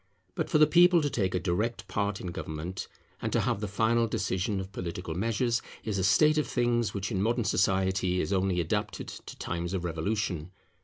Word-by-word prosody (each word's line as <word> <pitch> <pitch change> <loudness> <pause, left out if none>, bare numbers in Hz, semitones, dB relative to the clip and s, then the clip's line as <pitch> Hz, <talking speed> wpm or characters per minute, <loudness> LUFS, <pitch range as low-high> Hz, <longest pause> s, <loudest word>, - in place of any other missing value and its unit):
But - - -2
for - - +3
the 155 - +7
people 175 +3 +6
to 145 - 0
take 95 -5 0
a - - +2
direct 100 +4 -1
part 100 -1 -1
in 90 - -5
government, 85 0 -5 0.3
and - - -2
to - - +2
have 100 - -1
the 105 - -2
final 115 +3 +2
decision 100 0 -1
of 95 0 -6
political 90 -2 -5
measures, 115 +5 0 0.2
is 105 -3 -2
a - - 0
state 150 - +5
of 150 - -1
things 120 -4 +1
which 100 +3 -3
in 95 -3 0
modern 115 +3 +1
society 95 -2 +1
is 95 - -1
only 95 -1 +1
adapted 105 +6 -2
to - - -10
times 85 +2 -3
of 90 - -2
revolution. 85 0 -2
100 Hz, 200 wpm, -29 LUFS, 90-115 Hz, 0.3 s, the